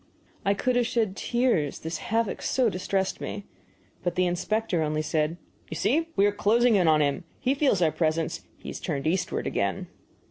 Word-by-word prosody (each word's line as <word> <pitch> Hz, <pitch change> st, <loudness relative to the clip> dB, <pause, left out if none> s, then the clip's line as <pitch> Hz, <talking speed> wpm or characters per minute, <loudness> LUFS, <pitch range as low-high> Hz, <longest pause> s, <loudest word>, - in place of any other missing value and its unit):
I 200 Hz, +1 st, +2 dB
could 250 Hz, +5 st, 0 dB
have 240 Hz, -1 st, +2 dB
shed 220 Hz, -5 st, 0 dB
tears, 235 Hz, -, +1 dB
this 160 Hz, 0 st, -5 dB
havoc 225 Hz, -1 st, -1 dB
so 255 Hz, -3 st, +2 dB
distressed 190 Hz, +1 st, -1 dB
me. 200 Hz, -, -5 dB, 0.6 s
But 175 Hz, -, -2 dB
the 185 Hz, -, +2 dB
inspector 180 Hz, +1 st, 0 dB
only 155 Hz, 0 st, 0 dB
said: 155 Hz, +1 st, 0 dB, 0.3 s
"You 160 Hz, -, -5 dB
see 315 Hz, -, +1 dB
we 200 Hz, -, +4 dB
are 205 Hz, -, +4 dB
closing 230 Hz, +3 st, +3 dB
in 180 Hz, -4 st, +3 dB
on 155 Hz, -1 st, +5 dB
him. 140 Hz, +2 st, -1 dB, 0.2 s
He 265 Hz, 0 st, +1 dB
feels 275 Hz, -, +2 dB
our 160 Hz, -, +3 dB
presence; 160 Hz, 0 st, -1 dB, 0.2 s
he -, -, -9 dB
has -, -, -6 dB
turned 140 Hz, +1 st, -3 dB
eastward 180 Hz, +4 st, 0 dB
again." -, -, -1 dB
190 Hz, 185 wpm, -27 LUFS, 160-230 Hz, 0.6 s, on